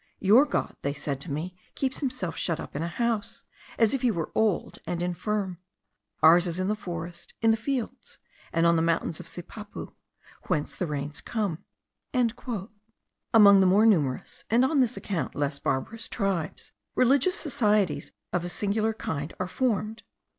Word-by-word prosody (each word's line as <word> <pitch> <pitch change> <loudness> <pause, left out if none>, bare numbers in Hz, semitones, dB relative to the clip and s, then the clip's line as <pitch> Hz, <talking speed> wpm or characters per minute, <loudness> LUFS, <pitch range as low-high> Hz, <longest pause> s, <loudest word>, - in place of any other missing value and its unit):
'Your 220 +9 +6
God,' 290 - -2 0.2
said 145 -2 -3
they - - -19
to 165 - -6
me, 165 +6 -3 0.2
'keeps 265 -1 -1
himself 255 - -2
shut 165 - -1
up - - -8
in 145 - -2
a 165 - -1
house, 230 +3 -2 0.3
as 225 0 +4
if 270 - 0
he 250 - +3
were 170 -7 -2
old 220 -4 0
and 175 0 -2
infirm; 185 +1 -2 0.6
ours 170 +3 +7
is 170 +1 -2
in 185 +1 0
the 210 - +1
forest, 175 -4 -7
in 225 0 +4
the - - +4
fields, 245 +1 -4 0.3
and 165 +1 +2
on 170 0 +5
the 160 - +3
mountains 165 -1 0
of 175 - -9
Sipapu, 205 +5 -7 0.5
whence 150 - -1
the 180 - -2
rains 145 0 -4
come.'" 205 -8 -2 0.5
Among 220 -3 +2
the 190 - +5
more 200 +4 +5
numerous, 150 -12 +1
and 240 +3 +4
on 285 +1 +2
this 250 0 +1
account 185 -5 -3
less 145 0 -1
barbarous 140 +14 -2
tribes, 195 -7 -2 0.2
religious 275 +7 +4
societies 215 - +1 0.2
of 175 - +1
a 175 - -3
singular 215 +4 0
kind 150 -7 -4
are 185 - 0
formed. 220 0 -1
200 Hz, 170 wpm, -27 LUFS, 170-225 Hz, 0.6 s, ours